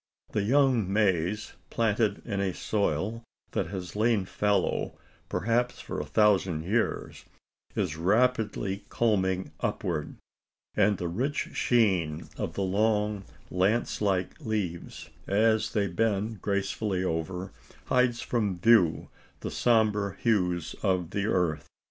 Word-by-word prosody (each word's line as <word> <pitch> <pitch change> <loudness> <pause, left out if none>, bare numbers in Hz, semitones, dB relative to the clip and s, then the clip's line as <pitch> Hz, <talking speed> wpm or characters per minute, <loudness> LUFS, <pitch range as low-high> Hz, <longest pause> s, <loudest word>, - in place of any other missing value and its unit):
The 105 - 0
young 125 -3 +3
maize 100 0 +1 0.2
planted 105 -2 +1
in 100 -4 -2
a 95 -2 -1
soil 110 +1 -1 0.3
that - - -1
has 90 0 -6
lain 110 -2 +2
fallow, 100 0 0 0.3
perhaps 120 +4 0
for - - -5
a - - -3
thousand 95 -7 +3
years 105 +7 -1 0.5
is 75 - -1
rapidly 105 0 +1
culming 95 -5 +1
upward; 80 -4 -2 0.6
and 105 -2 +3
the 90 - -3
rich 125 - -2
sheen 95 -10 +1
of - - -4
the 100 - -1
long 105 +1 +1 0.3
lance 100 +7 +1
like 95 - 0
leaves, 100 -7 -4 0.2
as 110 +2 +2
they 105 -2 +2
bend 105 +2 -1
gracefully 100 -1 -1
over, 90 +2 -3 0.3
hides 125 -2 +2
from 105 -6 -1
view 95 -4 +4 0.3
the - - -4
sombre 105 -4 +2
hues 90 -7 +1
of 95 -4 0
the 100 +1 -1
earth. 80 -7 0
100 Hz, 120 wpm, -28 LUFS, 90-110 Hz, 0.6 s, view